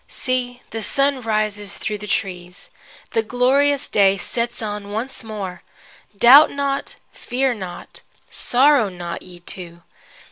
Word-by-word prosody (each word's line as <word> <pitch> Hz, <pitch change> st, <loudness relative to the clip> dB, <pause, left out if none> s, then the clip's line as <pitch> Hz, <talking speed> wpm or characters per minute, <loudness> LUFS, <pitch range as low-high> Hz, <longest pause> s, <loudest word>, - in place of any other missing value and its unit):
See, 250 Hz, -1 st, -3 dB
the 225 Hz, -, -4 dB
sun 275 Hz, +4 st, +1 dB
rises 215 Hz, -2 st, -2 dB
through 210 Hz, -1 st, -3 dB
the 210 Hz, -, -8 dB
trees. 180 Hz, -2 st, -4 dB, 0.4 s
The 225 Hz, -, +1 dB
glorious 265 Hz, +5 st, +2 dB
day 195 Hz, -1 st, +3 dB
sets 235 Hz, +5 st, -3 dB
on 205 Hz, -2 st, -5 dB
once 235 Hz, +5 st, -4 dB
more. 200 Hz, -5 st, -6 dB, 0.6 s
Doubt 265 Hz, +8 st, +8 dB
not, 280 Hz, -1 st, -3 dB, 0.2 s
fear 260 Hz, +1 st, -1 dB
not, 185 Hz, -5 st, -9 dB, 0.3 s
sorrow 260 Hz, -3 st, +4 dB
not, 175 Hz, -2 st, -6 dB
ye 175 Hz, -1 st, -14 dB
two. 170 Hz, -1 st, -8 dB
220 Hz, 130 wpm, -21 LUFS, 195-255 Hz, 0.6 s, Doubt